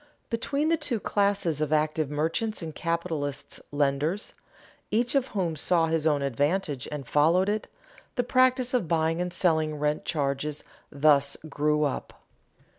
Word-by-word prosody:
Between 280 +6 0
the 330 - +3
two 250 -7 0
classes 200 -7 0
of 155 -1 -1
active 155 -1 +1
merchants 165 +8 -1
and 160 -1 -6
capitalist 165 -5 -3
lenders, 145 +7 0 0.6
each 235 +3 +1
of 275 -2 +2
whom 180 -8 -2
saw 165 +2 +2
his 160 -1 +1
own 145 -2 +2
advantage 145 +1 -1
and 145 -4 -5
followed 165 +8 +3
it, 210 +1 -2 0.5
the 245 - +1
practice 255 0 +3
of 240 -9 +1
buying 165 0 +1
and 180 0 -2
selling 160 -4 +1
rent 150 0 -1
charges 145 -1 -2 0.3
thus 140 -1 +4
grew 150 +1 +1
up. 145 - -2
160 Hz, 145 wpm, -27 LUFS, 150-200 Hz, 0.6 s, thus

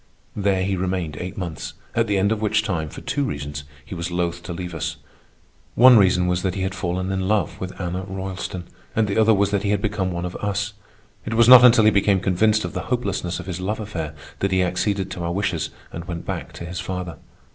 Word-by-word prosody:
There 100 -2 +1
he 95 +1 0
remained 90 -4 -2
eight 90 +2 -6
months, 85 -5 -5 0.2
at - - +1
the 100 -1 +1
end 100 +2 +2
of 110 -1 -1
which 105 0 +2
time, 80 -7 -2
for - - -9
two 145 - -1
reasons, 70 - -4 0.2
he - - -8
was 85 -1 -3
loath 85 0 -2
to 90 - -7
leave 90 0 -5
us. 80 -3 -3 0.8
One 125 +1 +8
reason 90 -4 +4
was 90 0 +1
that 95 -1 -1
he 95 - -2
had 95 0 -2
fallen 95 0 -2
in 95 -1 -1
love 105 -5 0
with 95 0 -6
Anna 90 0 -2
Roylston, 95 -1 -5 0.3
and 110 -1 +2
the 100 +2 0
other 110 0 +5
was 100 0 +2
that 100 -2 +1
he 100 - -1
had 105 -1 +2
become 100 -2 -1
one 85 0 -3
of 90 - -5
us. 105 +1 -2 0.5
It 115 - -3
was 115 0 +5
not 125 0 +11
until 120 -3 +7
he 110 - +7
became 100 -1 +3
convinced 105 +4 +2
of - - -5
the - - -4
hopelessness 100 -8 -1
of - - -7
his 95 -1 -5
love 105 +4 -2
affair 80 -8 -5 0.2
that 100 - 0
he 95 -1 +3
acceded 95 +1 -1
to 90 - -5
our 85 - -1
wishes 90 -3 -1 0.2
and 85 +1 -7
went 85 -2 -6
back - - -4
to 85 - -7
his 90 +1 -5
father. 90 -3 -5
95 Hz, 235 wpm, -23 LUFS, 90-105 Hz, 0.8 s, not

